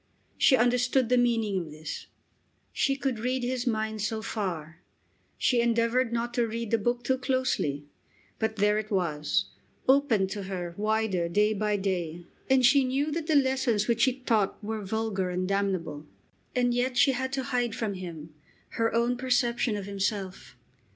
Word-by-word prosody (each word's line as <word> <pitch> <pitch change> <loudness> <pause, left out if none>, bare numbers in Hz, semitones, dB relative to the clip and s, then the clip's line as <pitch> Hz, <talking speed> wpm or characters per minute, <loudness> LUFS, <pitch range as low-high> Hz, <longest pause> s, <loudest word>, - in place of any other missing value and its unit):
She 265 - +5
understood 245 +1 +2
the 250 - +4
meaning 225 -5 +1
of 170 -3 -6
this. 155 +1 -7 0.7
She 275 - +1
could 270 -4 -2
read 250 +2 -1
his 250 0 -2
mind 220 -2 -1
so 220 +1 -2
far. 170 -8 -4 0.6
She 245 -2 +2
endeavoured 235 +1 +2
not 235 0 -2
to 240 -2 +1
read 230 0 -4
the 230 - +3
book 240 +3 -1
too 260 +1 0
closely, 255 - -1 0.5
but 220 0 -1
there 210 0 +2
it 215 0 -6
was, 150 - 0 0.4
opened 255 -8 +3
to 205 -2 -4
her 180 -3 -4
wider 210 -4 0
day 210 +4 +3
by 210 0 0
day, 175 -4 -3 0.2
and 260 -1 +5
she 275 +2 +6
knew 275 +4 0
that 320 0 -3
the 315 - +2
lessons 260 -6 +2
which 235 +2 +3
it 260 0 -2
taught 210 -4 +2
were 215 0 -3
vulgar 200 -2 -1
and 180 +1 -2
damnable. 185 -7 -2 0.5
And 245 -1 +2
yet 245 +1 0
she 280 0 +5
had 260 0 -2
to 270 -1 -1
hide 240 -2 0
from 225 -4 -2
him 165 -4 -8 0.4
her 230 -1 0
own 240 +1 +2
perception 245 -3 +1
of 200 -2 -4
himself! 195 -1 -3
225 Hz, 170 wpm, -28 LUFS, 195-250 Hz, 0.7 s, she